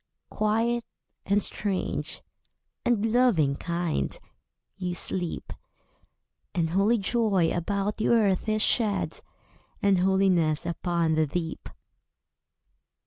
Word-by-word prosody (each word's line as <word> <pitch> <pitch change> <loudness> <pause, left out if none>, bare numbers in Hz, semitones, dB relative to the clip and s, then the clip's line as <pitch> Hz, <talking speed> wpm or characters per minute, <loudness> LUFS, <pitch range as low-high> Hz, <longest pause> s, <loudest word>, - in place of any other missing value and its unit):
Quiet, 230 +3 +1 0.4
and 200 +1 +2
strange, 200 -3 -3 0.6
and 225 -2 +1
loving 195 - +3
kind, 170 - -2 0.6
you 180 -2 -3
sleep. 175 0 -2 1.0
And 165 -2 0
holy 200 +6 +3
joy 200 -5 +1
about 200 +4 -1
the 215 - 0
earth 215 -3 +2
is 215 0 +1
shed; 215 -4 0 0.6
And 200 -2 +3
holiness 180 -4 +2
upon 170 -1 0
the 155 0 +2
deep. 165 +2 -4
190 Hz, 95 wpm, -27 LUFS, 170-215 Hz, 1.0 s, loving